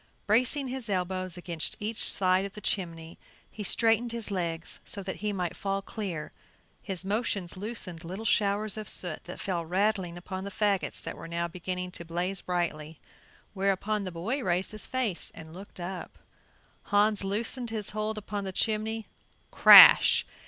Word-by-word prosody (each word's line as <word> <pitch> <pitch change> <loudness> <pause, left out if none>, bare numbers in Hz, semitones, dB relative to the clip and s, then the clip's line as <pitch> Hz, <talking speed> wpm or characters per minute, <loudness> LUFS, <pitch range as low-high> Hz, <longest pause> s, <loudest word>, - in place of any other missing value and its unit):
Bracing 255 +6 +2
his 255 -3 -5
elbows 185 -1 -2
against 170 -3 -3
each 215 +1 0
side 185 0 +2
of 200 0 -6
the - - -9
chimney, 165 -5 -2 0.3
he 215 - -8
straightened 230 +3 +2
his 230 -3 -3
legs 170 -3 -3
so 200 - -1
that 190 0 -5
he 210 0 -2
might 180 -4 -3
fall 195 0 -2
clear 185 -9 -5 0.5
His 190 -3 -3
motions 200 -4 -1
loosened 185 -5 -5
little 190 +6 -6
shower 205 0 +2
of 215 -2 -5
soot 175 -4 +1
that 180 - -8
fell 175 -3 -2
rattling 185 0 0
upon 185 +2 -6
the 200 - -5
fagots 200 -1 0
that - - -5
were - - -9
now 170 +1 -2
beginning 180 +1 -4
to 170 - -6
blaze 175 +3 -3
brightly, 165 -3 -3 0.5
whereupon 200 +2 0
the 185 - -5
boy 210 +12 -2
raised 180 0 0
his 215 -1 -8
face 245 -9 -2
and 160 -1 -11
looked 190 +1 -11
up. 180 +1 -6 0.7
Hans 205 0 +2
loosened 230 +5 -2
his 215 -2 -3
hold 215 +1 -3
upon 205 -1 -4
the 190 - -4
chimney; 220 +2 -1 0.5
crash! - - +9
195 Hz, 165 wpm, -28 LUFS, 175-215 Hz, 0.7 s, crash